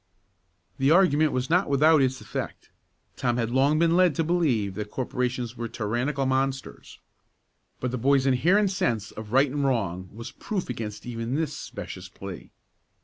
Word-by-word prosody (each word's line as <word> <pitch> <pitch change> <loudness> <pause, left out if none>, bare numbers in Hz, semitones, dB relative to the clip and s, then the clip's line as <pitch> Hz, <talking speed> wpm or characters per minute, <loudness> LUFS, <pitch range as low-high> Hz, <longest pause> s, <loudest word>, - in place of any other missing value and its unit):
The 135 +1 +3
argument 155 -3 +4
was 130 0 -1
not 180 +1 +2
without 150 +2 +5
its 130 -1 +1
effect. - - -6 0.4
Tom 120 -2 0
had 115 -1 -1
long 140 +4 +3
been 165 +1 +3
led 180 -4 +4
to 165 - +1
believe 145 - +1
that 105 +1 -5
corporations 125 -1 -3
were 120 -1 -4
tyrannical 120 +6 -2
monsters. 135 0 -2 0.8
But 125 - -2
the 125 - -3
boy's 135 +2 +3
inherent 180 +10 +3
sense 115 - -1
of 110 -1 -9
right 135 +2 +4
and 145 0 -1
wrong 95 -9 -1
was 115 +3 -8
proof 190 -11 -4
against 105 -3 -6
even 115 +1 -3
this 155 -1 -1
specious - - -8
plea. - - -9
130 Hz, 160 wpm, -26 LUFS, 115-150 Hz, 0.8 s, without